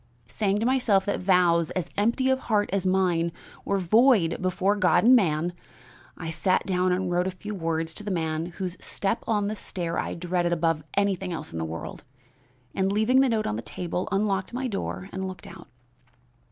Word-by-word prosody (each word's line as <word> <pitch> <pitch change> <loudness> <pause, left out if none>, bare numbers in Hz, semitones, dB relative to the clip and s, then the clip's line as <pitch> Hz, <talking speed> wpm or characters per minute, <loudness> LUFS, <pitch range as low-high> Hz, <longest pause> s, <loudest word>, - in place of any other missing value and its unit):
Saying 200 - 0
to 220 - -1
myself 240 -7 +2
that 200 - -1
vows, 175 -3 +3
as 185 -3 -3
empty 235 +6 +2
of 260 - +1
heart 210 -5 0
as 195 -1 0
mine, 180 -3 +2 0.3
were 200 - 0
void 200 -1 +3
before 185 +2 +1
God 180 -6 +3
and 250 +3 +7
man, 175 -5 +1 0.6
I 165 -1 -5
sat 180 +3 +1
down 185 -1 +1
and 180 0 0
wrote 175 +1 +1
a - - +1
few 195 +3 -7
words 165 -3 -2
to 210 - -6
the 210 - -4
man 160 -2 -1
whose 180 0 -6
step 200 +3 -2
on 210 -3 +1
the 215 - -2
stair 170 -4 -4
I - - -3
dreaded 175 0 0
above 165 -2 0
everything 195 -2 0
else 155 -2 -6
in 80 - -4
the 80 - -2
world; 80 +9 -7 0.7
and, 190 0 0
leaving 220 +6 +3
the 270 - +3
note 220 -2 0
on 105 - -2
the - - -4
table, 180 - -4
unlocked 195 0 0
my 255 +1 -2
door 90 - -4
and 190 0 -4
looked 185 -1 -8
out. 170 0 -11
185 Hz, 195 wpm, -26 LUFS, 170-205 Hz, 0.7 s, and